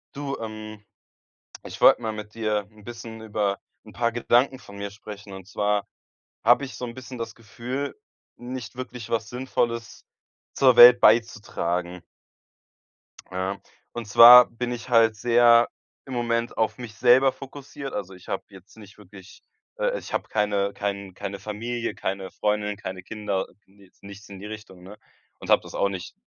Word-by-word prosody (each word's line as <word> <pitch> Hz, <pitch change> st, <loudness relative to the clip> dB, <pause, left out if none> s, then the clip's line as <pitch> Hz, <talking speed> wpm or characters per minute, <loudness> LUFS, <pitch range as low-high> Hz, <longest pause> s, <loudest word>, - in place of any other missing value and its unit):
Du, 140 Hz, -1 st, -4 dB
ähm, 110 Hz, -1 st, -8 dB, 0.8 s
ich -, -, -9 dB
wollte -, -, +6 dB
mal 110 Hz, -1 st, -2 dB
mit 105 Hz, 0 st, -9 dB
dir 105 Hz, -2 st, -1 dB
'n 105 Hz, -1 st, -19 dB
bisschen 115 Hz, -1 st, -9 dB
über 105 Hz, -3 st, -2 dB, 0.3 s
'n -, -, -14 dB
paar 115 Hz, -1 st, -1 dB
Gedanken 120 Hz, +3 st, +2 dB
von 100 Hz, -5 st, -14 dB
mir 100 Hz, 0 st, -5 dB
sprechen. 100 Hz, 0 st, -11 dB
Und 95 Hz, -1 st, -10 dB
zwar 105 Hz, 0 st, -1 dB, 0.6 s
habe 120 Hz, +5 st, +4 dB
ich 130 Hz, -, -9 dB
so -, -, -6 dB
'n 115 Hz, -1 st, -7 dB
bisschen 130 Hz, 0 st, -9 dB
das 115 Hz, -1 st, -6 dB
Gefühl, 125 Hz, -, -6 dB, 0.4 s
nicht 120 Hz, -2 st, -7 dB
wirklich 125 Hz, -3 st, -8 dB
was 110 Hz, -1 st, -1 dB
Sinnvolles 120 Hz, -2 st, -3 dB, 0.5 s
zur 130 Hz, -3 st, +4 dB
Welt 120 Hz, 0 st, +10 dB
beizutragen. 90 Hz, -6 st, +1 dB, 1.3 s
Ja, 95 Hz, +2 st, -3 dB, 0.3 s
und 120 Hz, -2 st, -6 dB
zwar 120 Hz, +4 st, +10 dB
bin 120 Hz, +1 st, -4 dB
ich 120 Hz, 0 st, -6 dB
halt 115 Hz, -2 st, +4 dB
sehr 120 Hz, +1 st, +5 dB, 0.4 s
im 135 Hz, -, -8 dB
Moment 120 Hz, -1 st, -1 dB
auf 110 Hz, -1 st, 0 dB
mich 120 Hz, -4 st, -9 dB
selber 130 Hz, +3 st, +5 dB
fokussiert. 140 Hz, 0 st, -9 dB
Also, 95 Hz, -2 st, -5 dB
ich 90 Hz, -, -16 dB
habe 95 Hz, -, -3 dB
jetzt 95 Hz, +2 st, -17 dB
nicht 105 Hz, -1 st, -15 dB
wirklich, 95 Hz, -1 st, -15 dB, 0.4 s
äh -, -, 0 dB
ich -, -, -11 dB
habe -, -, -2 dB
keine 100 Hz, -2 st, 0 dB
kein 100 Hz, -2 st, -4 dB
keine 100 Hz, +1 st, -6 dB
Familie, 115 Hz, +4 st, -4 dB
keine 95 Hz, 0 st, -4 dB
Freundin, 105 Hz, -1 st, -1 dB
keine 95 Hz, -2 st, -7 dB
Kinder, 100 Hz, -2 st, -3 dB, 0.2 s
ne, 100 Hz, +1 st, -22 dB
jetzt 90 Hz, -, -29 dB
nichts 100 Hz, +1 st, -12 dB
in 100 Hz, -1 st, -10 dB
die 100 Hz, -, -9 dB
Richtung, 105 Hz, -4 st, -10 dB
ne? 100 Hz, +3 st, -12 dB, 0.4 s
Und, -, -, -10 dB
habe -, -, +5 dB
das -, -, -11 dB
auch 100 Hz, -, +1 dB
nicht 95 Hz, -2 st, -7 dB
110 Hz, 170 wpm, -24 LUFS, 100-120 Hz, 1.3 s, Welt